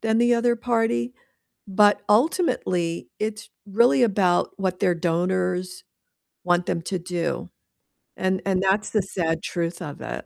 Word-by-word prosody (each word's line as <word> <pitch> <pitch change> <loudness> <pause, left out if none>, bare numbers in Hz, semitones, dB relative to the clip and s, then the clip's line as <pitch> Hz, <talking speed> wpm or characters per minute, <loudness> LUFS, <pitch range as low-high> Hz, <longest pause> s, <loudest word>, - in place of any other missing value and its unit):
than 220 0 +1
the 240 0 +4
other 235 0 +2
party, 225 - 0 0.5
but 205 +1 +3
ultimately 210 - +1
it's 215 0 -4 0.2
really 235 +5 +3
about 195 -6 +2
what 185 -2 -1
their 180 -3 +2
donors 180 +2 -1 0.6
want 175 0 +2
them 170 - -2
to 185 +2 -2
do, 175 -1 -3 0.7
and 185 0 0
and 190 -1 +1
that's 195 +2 +1
the 215 - +1
sad 165 -4 -2
truth 170 -1 -3
of 145 -1 -8
it. - - -6
185 Hz, 140 wpm, -24 LUFS, 175-215 Hz, 0.7 s, the